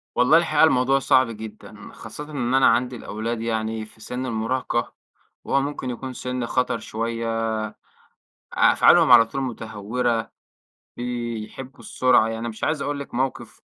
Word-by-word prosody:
والله 125 +6 +5
الحقيقة 160 -3 +3
الموضوع 135 -3 +4
صعب 130 -1 +4
جدًا، 110 0 -10
خاصةً 150 - -8
إن 125 -4 -2
أنا 135 0 +5
عندي 125 +2 +2
الأولاد 115 +1 -4
يعني 110 -1 -2
في 110 - -20
سِن 125 +3 -4
المراهقة، 120 +1 -2 0.5
وهو 140 - +1
ممكن 140 -2 -4
يكون 130 +2 -5
سِن 125 0 -4
خطر 125 -1 0
شوية، 115 +1 -3 1.1
أفعالهم - - +5
على 115 - +9
طول 135 +4 -4
مُتهورة، 115 -1 -2 0.7
بيحبوا 120 +1 -5
السرعة، 125 -3 +3
يعني 115 0 -3
أنا 115 +1 -4
مش 110 -1 -5
عايز 155 -2 0
أقول 145 0 -3
لِك 140 - -9
موقف 130 +2 -3
120 Hz, 145 wpm, -23 LUFS, 115-130 Hz, 1.1 s, على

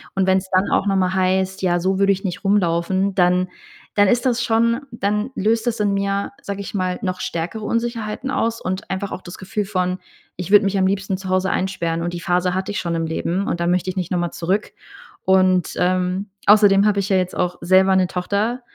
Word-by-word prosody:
Und 190 -1 +2
wenn's 190 0 +2
dann 185 +2 +2
auch - - +2
nochmal 190 -2 +1
heißt: 190 +1 0
„Ja, 175 -1 +2
so 190 +1 0
würde 195 0 +4
ich 195 - -7
nicht 190 +1 -4
rumlaufen“, 190 0 +1
dann 180 0 +2 0.5
dann 205 -1 +5
ist 240 +6 +2
das 245 -2 +1
schon 230 +2 +2
dann 210 +2 -1
löst 220 +3 0
das 235 -2 -1
in 200 -1 +1
mir, 200 0 -1
sage 200 0 -5
ich 200 - -7
mal, 185 -2 -1
noch 185 -3 -3
stärkere 175 +6 -4
Unsicherheiten 230 +2 -2
aus. 230 0 -1
Und 185 +1 -4
einfach 190 +1 -3
auch - - -5
das 175 -1 -10
Gefühl 205 +2 -3
von: 185 -2 -1 0.4
„Ich 185 +1 -5
würde 205 0 +7
mich 195 0 0
am 190 -1 +3
liebsten 195 0 -1
zu 190 0 -8
Hause 185 0 +1
einsperren.“ 170 -3 -1
Und 175 0 -3
die 175 - -5
Phase 180 0 +1
hatte 190 +2 -2
ich 205 - -2
schon 170 -1 -2
im 165 0 -1
Leben. 175 +4 -2
Und 175 - -2
da 170 - 0
möchte 180 +1 +1
ich 185 - -5
nicht 180 -2 -3
noch 180 - +1
mal 175 -1 -2
zurück. 190 +5 -2 0.5
Und, 185 -2 +3
ähm, 185 +2 0 0.2
außerdem 205 -1 +6
habe 205 -1 +2
ich 195 - -4
ja 190 - +3
jetzt 185 -1 -1
auch 180 -1 -1
selber 190 +1 +4
'ne 185 -1 +3
Tochter 200 +7 -2
190 Hz, 225 wpm, -20 LUFS, 180-205 Hz, 0.5 s, würde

